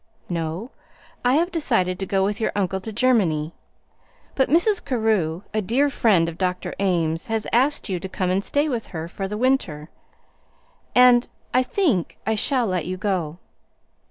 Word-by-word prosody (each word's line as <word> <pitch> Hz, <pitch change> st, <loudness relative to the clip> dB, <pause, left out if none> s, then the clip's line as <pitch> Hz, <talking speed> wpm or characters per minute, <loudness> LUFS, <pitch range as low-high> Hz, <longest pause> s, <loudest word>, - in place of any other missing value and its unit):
"No; 170 Hz, -, -3 dB, 0.5 s
I 250 Hz, +2 st, +3 dB
have 340 Hz, +4 st, +1 dB
decided 230 Hz, -, 0 dB
to 195 Hz, -, -3 dB
go 195 Hz, -1 st, +1 dB
with 205 Hz, +3 st, -2 dB
your -, -, +1 dB
uncle 190 Hz, -1 st, -1 dB
to 220 Hz, -, -6 dB
Germany. 195 Hz, -10 st, +1 dB, 0.8 s
But 265 Hz, -, +1 dB
Mrs. 355 Hz, +6 st, +3 dB
Carew, 215 Hz, -, 0 dB
a 215 Hz, -, +1 dB
dear 265 Hz, +8 st, +1 dB
friend 195 Hz, -11 st, +3 dB
of 165 Hz, 0 st, -7 dB
Dr. 180 Hz, -1 st, -2 dB
Ames, 170 Hz, -4 st, 0 dB
has 225 Hz, -1 st, -1 dB
asked 265 Hz, +4 st, +2 dB
you 185 Hz, -4 st, -2 dB
to 190 Hz, -, -7 dB
come 185 Hz, -1 st, -1 dB
and 190 Hz, +2 st, 0 dB
stay 290 Hz, +6 st, 0 dB
with 240 Hz, -6 st, -3 dB
her 160 Hz, -1 st, -6 dB
for 195 Hz, +2 st, -5 dB
the 210 Hz, +2 st, -4 dB
winter, 200 Hz, -, 0 dB, 1.1 s
and 250 Hz, -1 st, +6 dB, 0.2 s
I 255 Hz, -, +5 dB
think 255 Hz, -, 0 dB
I 220 Hz, -, +1 dB
shall 245 Hz, +3 st, +2 dB
let 185 Hz, -5 st, -2 dB
you 185 Hz, 0 st, -3 dB
go." 180 Hz, -5 st, -2 dB
205 Hz, 170 wpm, -23 LUFS, 180-250 Hz, 1.1 s, and